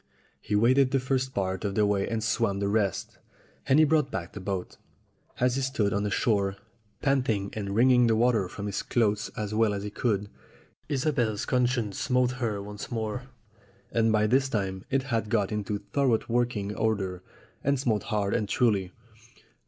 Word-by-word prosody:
He 105 - -2
waded 130 +5 +4
the 135 0 +1
first 130 0 -1
part 95 -4 -2
of 100 -1 -2
the 105 - +3
way 100 -1 0
and 115 -1 -2
swam 115 -3 +1
the 100 - 0
rest, 100 -3 -1 0.5
and 135 - +5
he 155 - +7
brought 155 0 +2
back 85 -3 -5
the - - -6
boat. 95 -1 -4 0.6
As 125 +1 +2
he - - 0
stood 130 -6 0
on 100 - 0
the 105 - -1
shore, 100 -3 +1 0.5
panting 120 -8 +1
and 100 -2 -4
wringing 125 +1 +5
the 115 - +3
water 115 -4 +2
from 100 - -6
his 100 -1 -2
clothes 105 -3 0
as 105 0 -3
well 110 -1 +2
as 100 - -4
he 105 - -5
could, 105 -2 -1 0.6
Isobel's 130 -7 0
conscience 125 -5 0
smote 125 -1 +2
her 110 -4 -1
once 105 0 -7
more, 115 +3 -3 0.6
and 115 -1 +2
by 110 0 +3
this 130 +4 +2
time 95 -5 -2
it 135 0 +1
had 115 -5 -2
got 105 -3 +1
into 105 -1 -2 0.2
thor 140 -1 +2
ough - - -5
working 115 -4 -1
order 100 -5 -1 0.4
and 140 -1 +1
smote 115 -5 0
hard 105 -3 -1
and 105 -2 0
truly. 100 -7 +1
110 Hz, 185 wpm, -27 LUFS, 100-125 Hz, 0.6 s, he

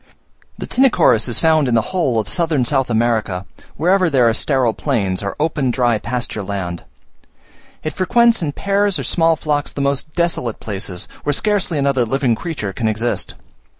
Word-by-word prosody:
The - - -5
Tinochorus 245 - +3
is 120 - +1
found 155 -3 +3
in 120 - +1
the 115 - 0
whole 135 -11 +1
of 110 - -3
southern 160 -7 +1
South 135 0 0
America, 110 -5 0 0.3
wherever 180 +3 +3
there 130 -5 +3
are 115 - +3
sterile 130 -2 +1
plains, 100 -11 -1
or 100 -1 -4
open 150 -4 0
dry 120 -3 +1
pasture 120 -1 -4
land. 95 -3 -4 1.0
It 155 - -3
frequents 235 +4 +3
in 155 -3 -1
pairs 200 +1 0
or - - -4
small 165 -1 +2
flocks 150 -2 -2
the - - -7
most 140 +2 -1
desolate 170 -10 -1
places, 95 -4 -5
where 145 - 0
scarcely 200 -2 0
another 140 -3 +2
living 130 +1 +1
creature 115 - -4
can 110 - -2
exist. 110 +2 -2
135 Hz, 170 wpm, -18 LUFS, 115-165 Hz, 1.0 s, Tinochorus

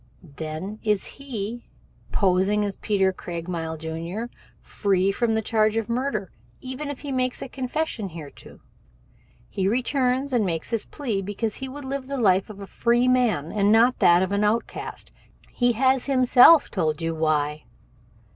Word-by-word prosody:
Then 160 +8 -6
is 210 -3 0
he, 240 -4 -6 0.4
posing 195 +2 +2
as 200 -2 -3
Peter 195 -3 +1
Craigmile, 165 -2 -5
Jr., 165 +8 -5 0.3
free 195 -1 0
from 225 +2 0
the 220 - 0
charge 215 0 +2
of 225 -1 -2
murder 235 -6 -2 0.3
even 260 +3 -6
if 285 - -6
he 285 -1 -5
makes 255 -1 -1
confession 255 -5 -3
thereto. 160 -4 -12 0.9
He 190 -1 -2
returns 255 +3 0
and 235 -3 +3
makes 165 -1 -3
this 230 -2 -1
plea 235 -10 -3
because 205 +3 -3
he 265 - -5
would 285 +1 -8
live 270 0 -4
the 275 0 -3
life 195 -5 +2
of 205 -2 -10
a 200 - -7
free 240 +4 +1
man 235 - +2
and 205 -1 +2
not 235 +3 +4
that 175 +1 +5
of 190 - -2
an 200 +1 +1
outcast. 215 +3 -2 0.4
He 245 -1 +2
has 260 +2 +2
himself 260 +3 +6
told 160 -5 -1
you 165 0 -2
why. 155 -1 0
215 Hz, 155 wpm, -24 LUFS, 185-255 Hz, 0.9 s, himself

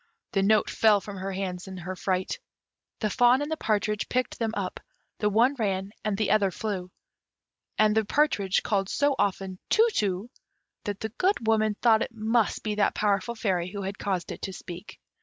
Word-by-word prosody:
The 195 - +1
notes 215 +2 +3
fell 215 -2 +5
from 200 0 -8
her 190 +1 -4
hands 185 -1 -4
in 190 -1 -7
her 185 +1 -5
fright; 185 0 -1 0.6
the 215 - +1
fawn 245 +3 +5
and 295 - -5
the - - +1
partridge 210 -3 0
picked 255 0 -1
them 225 -1 0
up: 190 -3 -3 0.4
the 210 - +2
one 235 +6 +4
ran 195 -2 -1
and 210 -2 -1
the 215 - +1
other 205 -2 +4
flew; 185 -1 -4 0.9
and 215 0 +4
the 220 - +3
partridge 210 -6 +1
called 195 -2 0
so 285 0 +2
often 190 -1 -1
"Tu 450 +2 +5
tu," 200 +3 -1 0.5
that 205 -1 -4
the 220 - -2
Good 365 - 0
Woman 215 -1 +2
thought 225 -2 +5
it 230 - -3
must 225 0 +1
be 215 - -1
that 210 0 +1
powerful 210 +3 +1
fairy 185 -6 0
who 200 -1 -5
had 195 +1 -5
caused 185 -4 -2
it - - -7
to 190 - -4
speak. 180 +2 -9
205 Hz, 195 wpm, -27 LUFS, 190-220 Hz, 0.9 s, fell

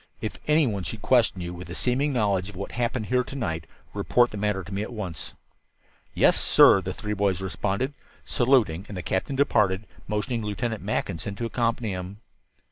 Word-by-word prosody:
If 110 - -5
any 150 0 +4
one 105 -6 -1
should 100 +3 -6
question 115 -7 +3
you, 85 0 -4
with 90 0 -9
a 85 - -6
seeming 130 +6 +1
knowledge 100 -6 +1
of 105 - -11
what 100 +2 -5
happened 120 -1 -1
here 125 +3 +2
to 135 - -9
night, 80 - -3 0.3
report 120 0 +2
the - - -7
matter 100 -2 0
to 95 - -9
me 100 - -1
at 110 - -5
once." 95 -10 -6 0.8
"Yes, - - +4
sir," 95 - +7
the 95 +1 -4
three 105 +2 -4
boys 100 -3 +1
responded, 100 +7 -2 0.3
saluting, 120 - +2
and 100 - -7
the 90 - -4
captain 95 - -1
departed, 105 -7 +2 0.2
motioning 110 +3 -1
Lieutenant 110 +2 -2
Mackinson 100 -1 -2
to 115 - -3
accompany 115 -2 0
him. 95 +2 -6
105 Hz, 190 wpm, -26 LUFS, 95-120 Hz, 0.8 s, sir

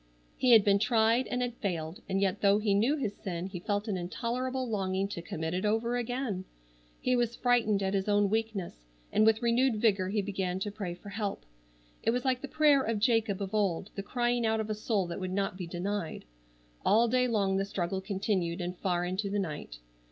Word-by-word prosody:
He 255 - +1
had 225 -4 +8
been 200 -1 +4
tried 230 +2 +3
and 250 0 -1
had 245 -1 -2
failed, 165 -4 -3
and 190 0 +1
yet 195 0 0
though 200 0 +5
he 210 -1 +1
knew 230 +9 +3
his 215 -8 -2
sin 175 -2 -4
he 190 -2 -6
felt 205 +3 -2
an 200 -3 -1
intolerable 250 +8 -2
longing 195 -3 -1
to 175 - -5
commit 160 -1 -4
it 185 +2 -1
over 225 +3 +1
again. 245 -5 -2 0.6
He 255 - +1
was 240 -1 0
frightened 225 -5 +2
at 190 0 0
his 195 +1 0
own 205 0 +4
weakness, 200 - -3 0.2
and 215 +1 +4
with 220 +1 +3
renewed 235 +1 +3
vigor 200 -4 +2
he 205 0 0
began 190 -2 -2
to 205 - -2
pray 200 -4 -5
for 190 +3 -11
help. 200 - -4 0.6
It - - 0
was 245 +2 0
like 255 -1 +1
the 280 - -5
prayer 295 -1 +4
of 230 -4 -1
Jacob 220 -3 +1
of 195 - -6
old, 200 -2 0
the 195 - -4
crying 240 +3 0
out 220 0 +1
of 220 0 -2
a - - +1
soul 210 -2 0
that 170 - -5
would 185 -1 -3
not 195 -1 -1
be 180 -2 -6
denied. 180 0 -3 0.6
All 225 +4 +4
day 250 +2 +2
long 200 -5 +1
the 195 - +1
struggle 190 -1 -2
continued, 190 -3 -1
and 180 0 -3
far 175 -1 -1
into 190 +3 -2
the 205 - -1
night. 150 - -4
205 Hz, 215 wpm, -30 LUFS, 190-230 Hz, 0.6 s, had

